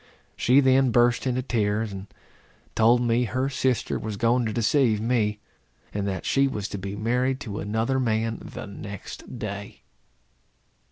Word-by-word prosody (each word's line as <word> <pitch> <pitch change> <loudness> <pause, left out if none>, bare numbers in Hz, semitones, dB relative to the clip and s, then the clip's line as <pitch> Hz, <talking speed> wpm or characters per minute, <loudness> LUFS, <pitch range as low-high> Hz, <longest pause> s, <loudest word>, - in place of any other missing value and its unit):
She 130 +3 +4
then 130 0 +4
burst 120 +1 +3
into 130 0 0
tears, 110 -3 0
and 95 0 -7 0.7
told 115 +2 +4
me 120 0 +2
her 130 +4 -1
sister 130 -4 0
was 110 -2 -5
going 120 +2 +2
to - - -2
deceive 115 0 +2
me; 110 -2 +1 0.6
and 100 -1 -2
that 95 -3 -3
she 140 0 +3
was 105 -7 -3
to 100 - -5
be 100 +1 -5
married 125 +5 0
to 105 -4 -5
another 110 +6 0
man 115 -2 0
the - - -7
next 100 +4 -8
day. 100 -2 -6
115 Hz, 155 wpm, -25 LUFS, 105-125 Hz, 0.7 s, She